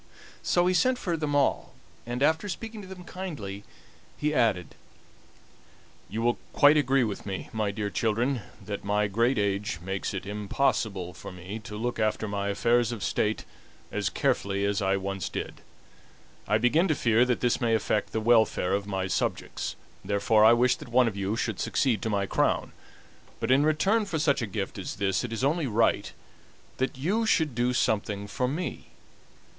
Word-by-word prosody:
So 175 0 +2
he 185 - +3
sent 250 +8 +3
for 175 -8 -2
them 150 -2 -2
all, 140 -2 +1 0.3
and, 120 +3 -1
after 160 +7 +2
speaking 220 +3 -6
to 190 - -10
them 185 -1 -9
kindly, 145 - -6 0.5
he 150 0 0
added: 110 - +1 1.4
"You 110 +2 -3
will 120 0 +1
quite 145 +1 +6
agree 135 -3 +3
with 105 -3 -3
me, 95 -1 -5
my 110 -2 0
dear 100 0 -3
children, 120 +3 0 0.2
that 100 0 -5
my 105 +1 +1
great 115 +6 +1
age 100 -1 0
makes 95 +3 -3
it 95 - -4
impossible 105 -3 -1
for 85 - -9
me 90 +4 -7
to 105 - -6
look 120 +1 -2
after 110 0 0
my 100 -1 -2
affairs 120 +3 +2
of 115 -4 -5
state 105 +1 0 0.5
as - - -1
carefully 100 0 0
as 100 0 0
I 95 0 +2
once 100 -2 -3
did. - - -6 0.9
I 105 - +3
begin 135 - +3
to 155 - +2
fear 115 -1 +3
that 125 -1 0
this 120 -1 +1
may 115 -1 +3
affect 105 -1 0
the 110 - -1
welfare 110 -5 +3
of 100 0 -1
my 95 -2 -2
subjects, 95 - -2 0.3
therefore 105 +2 +3
I 110 +2 +8
wish 120 +1 +3
that - - -11
one 125 0 +4
of 110 - -2
you 100 +2 -1
should 115 -3 -2
succeed 120 -7 +1
to 115 - -2
my 100 -2 0
crown; - - 0 0.7
but 115 - 0
in 135 +2 +5
return 195 +9 +2
for 175 -5 -2
such 145 -4 +2
a 115 - -2
gift 100 0 -4
as 95 - -5
this 95 +1 0
it 120 - -4
is 115 +3 -3
only 150 +2 +1
right 115 0 +1 0.7
that 130 0 -1
you 205 +11 0
should 160 - +2
do 120 +1 +1
something 105 -4 0
for 125 +5 -2
me. 155 +3 -4
115 Hz, 185 wpm, -27 LUFS, 100-140 Hz, 1.4 s, I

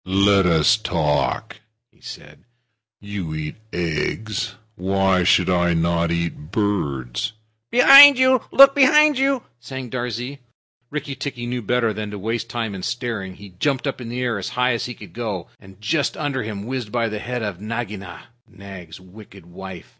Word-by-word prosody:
"Let 100 0 +3
us 85 +6 +4
talk," 90 +3 -1 0.3
he - - -31
said. - - -12 0.6
"You 100 -6 -5
eat 75 -1 -5 0.2
eggs. 90 +5 -3 0.2
Why 95 0 +1
should 90 0 +3
not 85 -1 +1
I - - -2
eat 85 -3 -3
birds?" 75 - -2 0.4
"Behind 275 - +9
you! 260 -1 +4
Look 275 0 +8
behind 300 0 +5
you!" 270 -2 +1 0.2
sang 130 -1 -8
Darzee. 125 +2 -4 0.5
Rikki 150 -1 -5
tikki 135 -3 -6
knew 125 0 -3
better 115 0 0
than 105 0 -5
to 105 - -7
waste 115 +3 -3
time 115 -3 -3
in 95 - -7
staring. 110 -4 -4
He 100 +1 -13
jumped 140 -3 0
up 135 -2 -3
in 115 - -7
the 125 +1 -3
air 120 -4 -1
as 95 - -5
high 125 0 +3
as 115 - -3
he 120 - -7
could - - -13
go, 105 -7 -5
and 95 -1 -17
just 145 +8 -1
under 145 -4 -2
him 105 -2 -6
whizzed 125 -3 -5
by 120 -1 0
the 105 -1 -4
head 125 +1 -4
of 100 -3 -5
Nagaina, 105 -6 -6 0.2
Nag's 95 -4 -11
wicked 95 0 -15
wife. 90 0 -10
105 Hz, 170 wpm, -21 LUFS, 95-125 Hz, 0.6 s, Behind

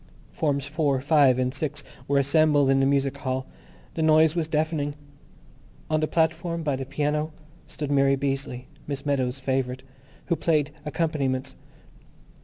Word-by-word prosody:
Forms 140 -3 -1
Four, 145 -2 0
Five, 140 -2 +4
and 130 0 0
Six 145 +1 -3 0.2
were 140 - +2
assembled 145 0 +4
in 135 - +3
the 135 - +3
music 140 0 +1
hall. 130 -1 -2 0.5
The 160 - -3
noise 155 0 +5
was 165 -3 0
deafening. 155 -2 -1 1.0
On 155 - +3
the 155 - 0
platform, 165 +1 0
by 145 -3 0
the 130 0 -5
piano, 150 +2 -1 0.4
stood 145 -2 -5
Mary 135 -1 +4
Beazley, 135 -2 -3 0.2
Miss 140 -1 -4
Meadows' 135 -2 0
favourite, 130 -1 -2 0.4
who 170 - +1
played 155 -2 +1 0.2
accompaniments. 140 -5 -1
140 Hz, 145 wpm, -25 LUFS, 135-155 Hz, 1.0 s, noise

